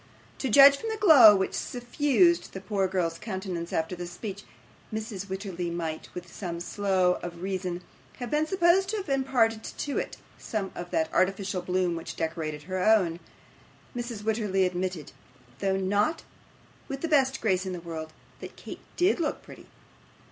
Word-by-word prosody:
To 265 - -1
judge 280 +4 +8
from 450 - -5
the 440 - -2
glow 280 - +9
which 190 -1 -1
suffused 290 +8 +1
the 190 - -5
poor 195 0 -1
girl's 175 -3 -1
countenance 185 -5 -5
after 160 +3 -1
this 175 0 -6
speech, 190 +3 -7 0.5
Mrs. 215 -3 -5
Wititterly 190 -3 -4
might, 165 -2 -4
with 180 -1 -7
some 170 -4 -5
show 185 0 +1
of 175 0 -7
reason, 185 -2 -3 0.3
have 245 -2 -6
been 305 +1 +1
supposed 375 +1 +3
to 435 - -1
have 385 -6 -5
imparted 250 -5 +1
to 285 - -3
it - - -5 0.2
some 205 -4 -3
of 175 0 -7
that 160 -2 -1
artificial 190 0 +1
bloom 180 -1 0
which 165 - -6
decorated 160 -2 -3
her 185 +2 -3
own. 185 -6 +3 0.8
Mrs. 235 -3 -5
Wititterly 210 -3 +1
admitted, 180 -3 -3 0.5
though 195 -1 +1
not 205 - 0 0.6
with 275 0 -5
the 330 - -1
best 265 -4 +3
grace 190 -3 0
in 185 - -3
the 180 - -5
world, 160 -2 -7 0.3
that - - -9
Kate - - -9 0.2
DID 360 +2 +3
look 325 - -2
pretty. - - -13
195 Hz, 165 wpm, -27 LUFS, 180-245 Hz, 0.8 s, glow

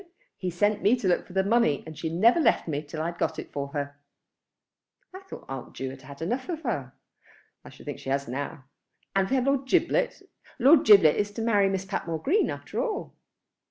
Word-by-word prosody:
He 185 - -3
sent 205 +4 +1
me 215 +5 +4
to 235 -6 -3
look 180 - +1
for - - -13
the 190 0 +2
money, 200 -8 +2
and 160 - -9
she 160 +2 -4
never 220 - +4
left 245 - +2
me 145 -2 -2
till 155 +1 -6
I 170 - -1
had 170 - -16
got - - -1
it - - -7
for 140 -1 -3
her." 145 0 -5 1.1
"I 375 - -8
thought 385 0 -11
Aunt 135 -1 -7
Ju 130 0 -4
had 135 0 -11
had 140 +3 -9
enough 250 - -3
of 325 -2 -4
her." 140 - -3 0.7
"I - - -12
should - - -15
think - - -6
she - - -7
has 140 +1 -1
now. 140 +3 -5 0.5
And 195 -1 +2
we 270 - +1
had 255 -1 +1
Lord 275 -1 +1
Giblet. - - +1 0.3
Lord 275 +4 +6
Giblet 195 -8 +7
is 205 0 0
to 225 - -4
marry 205 -4 +3
Miss 190 0 -2
Patmore 170 -4 -3
Green 395 +10 +2
after - - -4
all." 445 -4 -4
190 Hz, 220 wpm, -27 LUFS, 145-240 Hz, 1.1 s, Giblet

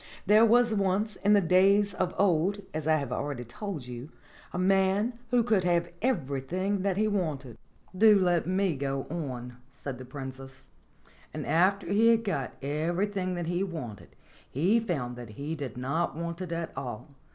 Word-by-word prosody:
There 210 +3 +6
was 235 0 +4
once 200 +1 0
in 205 +1 +3
the 205 - +6
days 195 +3 +4
of 185 -1 -2
old, 195 +2 +2
as 155 0 -3
I 160 - +5
have 140 -3 -2
already 140 -4 -3
told 155 - -6
you, 125 +3 -8 0.4
a - - -5
man 195 +4 +2 0.2
who 245 -1 +3
could 220 -5 +2
have 170 -1 +1
everything 185 - -1
that 195 -1 0
he 215 +1 +2
wanted." 155 - -2 0.4
"Do 210 +2 +7
let 175 -3 +2
me 185 -2 +1
go 135 0 -2
on," 125 -7 -5
said 135 -2 -7
the 130 - -8
Princess. 135 0 -9 0.6
"And - - -4
after 190 +4 +2
he 205 +5 +3
had 230 -1 +4
got 140 - -2
everything 180 +6 -1
that 175 -1 -3
he 175 +3 0
wanted 145 - -7 0.3
he 185 - +2
found 140 - -3
that 120 -2 -8
he 140 +9 -5
did 140 -7 -5
not 150 +6 -1
want 170 +1 -4
it 180 -2 -5
at 165 0 -4
all. 120 -1 -6
175 Hz, 175 wpm, -28 LUFS, 140-200 Hz, 0.6 s, Do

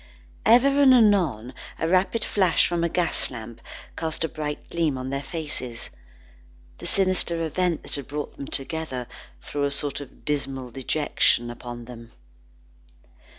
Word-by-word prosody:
Ever 275 +5 +6
and 265 -2 +8
anon 175 - +3 0.2
a 165 - -1
rapid 185 +6 +2
flash 185 -4 +3
from 170 -1 0
a 170 - +2
gas 175 0 +1
lamp, 115 -1 -9 0.3
cast 160 0 -2
a - - +1
bright 150 -1 -5
gleam 160 -5 +1
on 130 +1 -4
their 140 0 -2
faces. 135 -5 -4 0.9
The - - -6
sinister 185 -3 +1
event 175 +1 0
that - - -4
had 140 -2 -2
brought 145 +1 -5
them 140 - -7
together, 135 -3 -1 0.4
threw 145 - -4
a 140 - +2
sort 140 0 +1
of 140 - -13
dismal 135 -4 -2
dejection 130 -2 +1
upon 120 0 -8
them. 115 -1 -11
150 Hz, 150 wpm, -25 LUFS, 130-175 Hz, 0.9 s, and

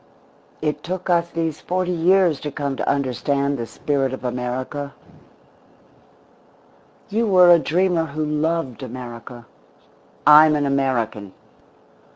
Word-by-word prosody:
It 150 -1 -2
took 185 +2 -4
us 170 0 +2
these 165 -2 -3
forty 180 0 -2
years 175 -2 +3
to 150 - -5
come 140 -1 -3
to - - -2
understand 140 +1 -1
the 115 - -4
spirit 135 -1 -2
of 130 - -7
America. 130 +3 -4 2.1
You 225 +2 0
were 180 -3 +6
a 170 - +7
dreamer 175 +1 +1
who 155 +1 -4
loved 150 -3 -2
America. 120 -1 -9 0.8
I'm 150 +1 +7
an 145 -1 0
American. 120 -7 -1
150 Hz, 120 wpm, -21 LUFS, 130-170 Hz, 2.1 s, a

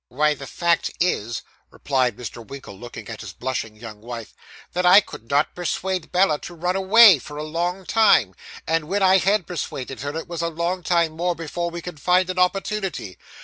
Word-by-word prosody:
'Why 150 +4 +1
the 135 -1 -9
fact 170 +6 +1
is,' 120 - -1 0.3
replied 130 -5 -1
Mr. 120 -1 -7
Winkle, 135 -4 -10
looking 120 +5 -10
at 110 -2 -7
his 105 -5 -8
blushing 120 -1 -4
young 110 -1 -10
wife, 115 -2 -8 0.4
'that 180 - 0
I 180 +3 +8
could 115 - -10
not 145 +2 +2
persuade 180 0 -3
Bella 180 -5 +3
to 175 - -9
run 180 +2 -1
away, 195 -2 +7
for 150 +3 -10
a 150 - -4
long 175 +4 -3
time. 200 - +4 0.3
And 165 -1 0
when 195 +3 0
I 190 0 +6
had 195 0 +2
persuaded 135 -6 -5
her, 145 +3 -4
it 165 - -6
was 170 -1 -4
a 170 - 0
long 170 +3 -2
time 170 -1 +2
more 175 +2 -1
before 170 +1 -4
we 170 0 -7
could 175 -4 -8
find 180 +3 +2
an 185 - -4
opportunity. 195 - -1
170 Hz, 195 wpm, -23 LUFS, 130-180 Hz, 0.4 s, I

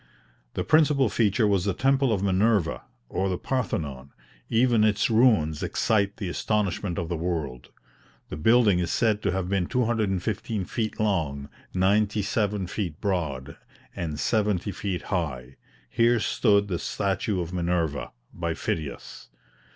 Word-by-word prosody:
The - - -1
principal 150 -5 +4
feature 105 0 +2
was 100 -3 +2
the 100 -3 0
temple 135 -1 +2
of 100 -3 0
Minerva, 100 -2 +2 0.3
or 95 +8 -1
the 90 - -1
Parthenon; 75 - -3 0.4
even 115 -1 +3
its 110 +1 +2
ruins 110 - +3
excite 100 -2 0
the 100 - -4
astonishment 100 -1 -1
of 85 - -2
the 85 - -2
world. 80 -7 -3 0.6
The - - -5
building 105 +3 +4
is 85 - -1
said 110 -3 +1
to 100 - 0
have 95 -1 -2
been 95 -2 0
215 110 -4 -1
feet 110 +3 -3
long, 80 -10 -1 0.3
ninety 105 +3 +2
seven 105 -2 0
feet 90 -4 -4
broad, 75 -9 -2 0.4
and 80 -4 -4
seventy 105 -3 0
feet 95 -3 -4
high; 70 -7 -3 0.3
here 115 - +3
stood 100 -2 +2
the 90 -4 -2
statue 100 0 -1
of 85 0 -4
Minerva, 85 -4 -1 0.2
by 85 -1 -3
Phidias. 75 -3 -5
100 Hz, 140 wpm, -26 LUFS, 85-110 Hz, 0.6 s, principal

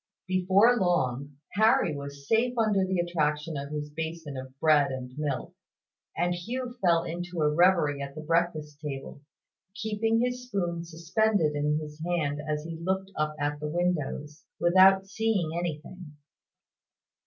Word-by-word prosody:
Before 190 +6 +4
long, 140 -6 0
Harry 205 -6 +3
was 140 0 -8
safe 240 +2 +2
under 215 -4 +3
the 185 0 0
attraction 155 -3 0
of 140 0 -4
his 150 -1 -4
basin 160 -1 -5
of 130 +1 -8
bread 150 -3 +4
and 125 -1 -6
milk; 145 -3 -3 0.6
and 175 +1 +1
Hugh 240 +8 -4
fell 170 -2 +4
into 175 +1 -5
a 150 0 +3
reverie 165 -4 +3
at 140 0 -6
the 155 - -6
breakfast 155 -2 0
table, 140 -2 -6 0.5
keeping 220 +1 0
his 250 +1 -1
spoon 175 -6 -2
suspended 170 +1 +1
in 150 +1 +1
his 155 0 -7
hand 155 -4 -1
as 150 0 -1
he 165 0 -7
looked 190 +2 -1
up 155 0 -1
at 145 0 -1
the 150 0 -3
windows, 150 -3 -2 0.2
without 190 +2 +6
seeing 205 -5 0
anything. 170 0 -5
165 Hz, 145 wpm, -28 LUFS, 150-190 Hz, 0.6 s, without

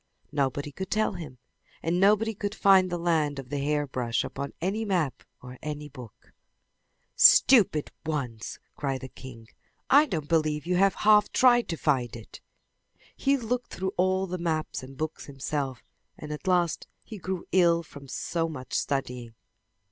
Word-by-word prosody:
Nobody 145 0 -1
could 190 +6 -6
tell 215 -1 +1
him, 155 -8 -8 0.5
and 170 +2 0
nobody 210 +3 +3
could 205 0 -4
find 190 -3 +5
the 175 - -2
land 160 -4 0
of 135 -2 -8
the 145 - -1
hairbrush 140 -5 -1
upon 140 0 -5
any 195 +6 -1
map 170 - -1 0.2
or 125 - -9
in 125 - -12
any 150 -1 -5
book. 125 -6 -13 0.8
"Stupid 200 - +6
ones!" 130 -8 -4 0.2
cried 135 -3 -3
the 130 - -7
king. 120 -4 -12 0.4
"I 290 +3 +7
don't 155 - -3
believe 155 -2 +1
you 180 +1 0
have 195 +1 +3
half 210 -1 +4
tried 240 -2 +4
to 165 - -2
find 130 -7 0
it!" 115 -2 -11 0.7
He 275 0 +2
looked 245 0 -3
through 190 +1 -3
all 185 +1 +1
the 180 -1 -5
maps 160 -2 -2
and 130 +1 -11
books 155 +1 -4
himself 135 -2 -4 0.3
and 150 - -8
at 150 +5 -7
last 175 -3 +1 0.2
he 215 -3 -9
grew 185 0 -4
ill 170 -2 +4
from 145 -3 -13
so 165 +4 -2
much 130 -5 -8
studying. 125 -4 -2
155 Hz, 165 wpm, -27 LUFS, 135-190 Hz, 0.8 s, I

